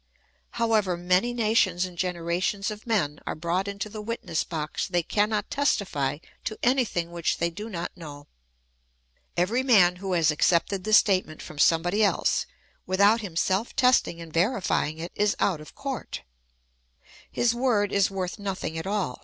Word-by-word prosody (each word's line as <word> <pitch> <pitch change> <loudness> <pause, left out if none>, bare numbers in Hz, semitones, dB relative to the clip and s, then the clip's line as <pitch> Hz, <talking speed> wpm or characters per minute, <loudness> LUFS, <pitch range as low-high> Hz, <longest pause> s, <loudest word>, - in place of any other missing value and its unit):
However 220 -6 +1
many 180 +7 +2
nations 215 -6 +2
and 180 -1 -9
generations 180 +3 -1
of 215 +2 -9
men 160 -11 0
are - - -2
brought 175 +4 -1
into 200 +1 -4
the 215 0 -7
witness 210 -7 -3
box, 155 -3 -3
they 175 -2 0
cannot 210 +3 0
testify 185 - 0 0.3
to 215 - -3
anything 235 -10 +1
which 170 -2 -1
they 170 0 0
do 210 +6 -7
not 175 -4 -5
know. 145 -5 -10 1.1
Every 205 +9 +2
man 195 -9 +5
who 190 0 -3
has 165 -3 +3
accepted 180 +5 +1
the 215 - -1
statement 185 -7 +3
from 155 - -10
somebody 175 +7 +3
else, 205 - +1 0.4
without 200 +5 +4
himself 190 +3 -1
testing 250 -9 +3
and 165 -2 -10
veriiying 175 - 0
it, 170 +2 -6
is 205 0 +1
out 170 -6 +1
of 155 - -13
court; 275 -3 -5 1.1
his 240 -1 +2
word 235 -5 +1
is 200 -1 +3
worth 190 +1 -4
nothing 185 -5 -4
at 160 - -6
all. 195 -10 -2
190 Hz, 155 wpm, -26 LUFS, 170-215 Hz, 1.1 s, man